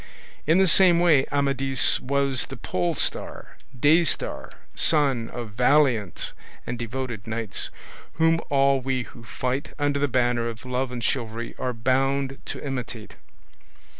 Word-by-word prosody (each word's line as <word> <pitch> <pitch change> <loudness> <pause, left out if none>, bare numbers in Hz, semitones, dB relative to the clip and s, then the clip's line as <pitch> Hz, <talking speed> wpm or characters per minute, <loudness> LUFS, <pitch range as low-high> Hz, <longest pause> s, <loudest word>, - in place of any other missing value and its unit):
In 160 +3 +4
the 190 - +5
same 180 -1 +5
way 160 -6 +4
Amadis 135 -2 +3
was 140 -1 0
the 135 - -9
polestar, 90 -5 -2 0.2
day 155 +6 +5
star, 160 - -1 0.2
sun 135 -7 +2
of 120 -3 -7
valiant 125 - +1 0.3
and 120 - -5
devoted 120 -2 -5
knights, 110 -2 -3 0.4
whom 165 +2 +2
all 140 -1 +3
we 130 -1 -2
who 120 0 -14
fight 125 +6 -4
under 145 -1 0
the 145 - +1
banner 120 -2 0
of 115 +1 -7
love 125 0 -2
and 120 -2 -5
chivalry 115 -1 -3
are 125 - -1
bound 135 +3 0
to - - -5
imitate. 125 -5 -6
130 Hz, 135 wpm, -24 LUFS, 120-140 Hz, 0.4 s, the